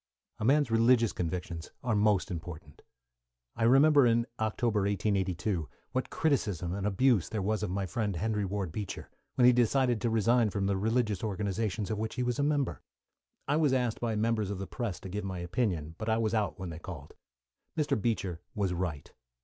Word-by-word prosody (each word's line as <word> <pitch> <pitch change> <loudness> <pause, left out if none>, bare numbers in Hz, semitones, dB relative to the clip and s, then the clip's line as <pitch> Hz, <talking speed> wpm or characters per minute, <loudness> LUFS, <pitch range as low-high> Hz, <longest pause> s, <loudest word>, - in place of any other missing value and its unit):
A - - -3
man's 140 0 +3
religious 115 0 +4
convictions 85 -1 -4
are 120 -4 +1
most 105 -1 +2
important. 80 -4 -8 0.7
I - - -6
remember 140 +2 +6
in 115 0 +3
October, 110 0 0
1882, 95 -3 0 0.2
what 130 - -2
criticism 105 - 0
and 100 +1 -2
abuse 105 -1 +2
there 105 -3 -2
was 110 +2 0
of - - -2
my 95 +1 -1
friend 100 +2 -2
Henry 105 +3 -1
Ward 95 -2 -2
Beecher, 100 +2 -6 0.2
when 125 - +4
he 125 - +8
decided 120 -1 +2
to 120 - +1
resign 115 +1 +3
from 100 0 -1
the 100 0 +1
religious 110 0 0
associations 105 0 -2
of 105 - -2
which 110 0 -3
he 125 - -1
was 125 +2 -1
a - - +2
member. 145 -2 0 0.7
I 145 - +2
was 150 -4 +3
asked 125 -3 0
by 115 -2 -1
members 110 -1 0
of 100 - -3
the 95 - -4
press 105 -5 -4
to - - -7
give 105 +3 -4
my 95 -2 -4
opinion, 85 -3 -2
but 110 0 -3
I 110 - +3
was 110 -1 0
out 110 -3 0
when 95 -3 -5
they 80 - -7
called. 75 -6 -9 0.6
Mr. 150 -8 +1
Beecher 95 -7 -1
was 100 -3 0
right. 85 -5 -4
105 Hz, 190 wpm, -30 LUFS, 95-120 Hz, 0.7 s, he